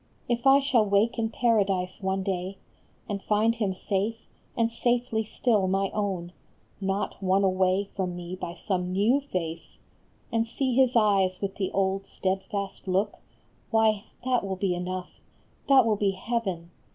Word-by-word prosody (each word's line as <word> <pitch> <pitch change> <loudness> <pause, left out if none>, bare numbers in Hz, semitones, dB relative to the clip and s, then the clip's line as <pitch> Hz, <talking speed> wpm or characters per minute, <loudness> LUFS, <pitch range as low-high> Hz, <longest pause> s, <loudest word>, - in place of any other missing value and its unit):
If 240 +2 0
I 270 +1 +8
shall 270 -5 +3
wake 210 +4 +2
in 225 -1 0
Paradise 200 -7 +1
one 190 0 -1
day 190 0 -3 0.5
And 200 -1 -3
find 215 +3 +2
him 215 -4 -1
safe, 200 +4 -2 0.3
and 230 0 +2
safely 240 -1 0
still 215 -2 +1
my 195 +1 0
own, 190 -4 -2 0.5
Not 195 +2 -2
won 190 +1 +2
away 190 +1 +2
from 180 -3 -2
me 175 +1 -6
by 175 -2 -5
some 180 -2 -2
new 210 +9 +3
face, 165 - -5 0.5
And 230 0 +1
see 260 +2 -1
his 255 0 +3
eyes 195 -4 +3
with 195 -1 -4
the 190 -2 -1
old 195 0 0
steadfast 195 +1 -3
look, 195 +3 0 0.5
Why, 220 -2 +2 0.2
that 250 -3 +2
will 195 -1 -2
be 185 -1 0
enough, 180 +1 -5 0.5
that 265 -3 +7
will 215 -2 +2
be 200 -1 +1
heaven 190 -5 -3
200 Hz, 155 wpm, -27 LUFS, 185-225 Hz, 0.5 s, I